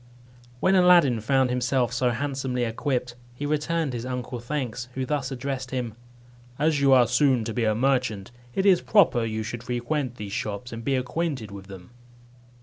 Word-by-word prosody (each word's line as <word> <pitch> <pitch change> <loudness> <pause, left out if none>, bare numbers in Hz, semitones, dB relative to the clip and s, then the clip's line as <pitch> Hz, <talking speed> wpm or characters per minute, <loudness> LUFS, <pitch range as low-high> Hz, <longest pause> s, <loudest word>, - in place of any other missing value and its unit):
When 190 - +3
Aladdin 175 - +5
found 130 +2 +2
himself 125 0 0
so 125 0 +1
handsomely 130 0 -2
equipped, 125 +1 -2 0.2
he 145 - -4
returned 150 0 -1
his 120 -1 -4
uncle 125 -1 -4
thanks, 125 -2 -4
who 130 0 -2
thus 140 -2 -2
addressed 135 0 -4
him: 125 -4 -3 0.6
"As 150 -1 +1
you 140 -1 +4
are 125 -2 +7
soon 125 +1 +2
to 110 0 -4
be 115 0 0
a 110 -1 +2
merchant, 125 -5 0 0.2
it 190 - +1
is 190 -3 +5
proper 185 - +4
you 110 -1 -2
should 115 +2 -5
frequent 125 +2 -2
these 105 -4 -7
shops, 105 +5 -4
and 115 0 -6
be 135 +1 +1
acquainted 130 -3 -2
with 100 -1 -10
them." 95 -1 -11
125 Hz, 175 wpm, -25 LUFS, 120-140 Hz, 0.6 s, are